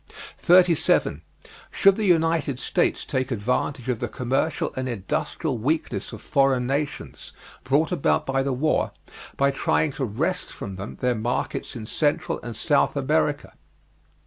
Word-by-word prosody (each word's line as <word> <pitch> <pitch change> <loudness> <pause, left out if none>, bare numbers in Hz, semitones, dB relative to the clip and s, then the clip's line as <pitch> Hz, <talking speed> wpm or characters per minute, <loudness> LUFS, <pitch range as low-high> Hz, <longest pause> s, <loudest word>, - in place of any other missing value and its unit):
37. 175 - +4 0.5
Should 195 -1 +4
the 215 - -1
United 165 -6 +2
States - - 0
take 130 0 -1
advantage 125 +2 -1
of 125 -3 -1
the - - -2
commercial 135 +4 -1
and 130 0 -3
industrial 120 - -2
weakness 155 +8 -1
of - - -10
foreign 135 -3 +2
nations, 140 +3 -4 0.3
brought 145 +6 +2
about 175 -6 +1
by 135 0 0
the 135 0 -1
war, 145 +5 +1 0.5
by 140 0 +3
trying 145 +2 +1
to 135 - -4
wrest 160 - -2
from 100 -2 -7
them 100 +2 -7
their 125 -1 +2
markets 120 +3 -3
in 110 -3 -6
Central 145 +6 0
and 120 -2 -7
South - - +2
America? - - 0
135 Hz, 145 wpm, -24 LUFS, 125-155 Hz, 0.5 s, 37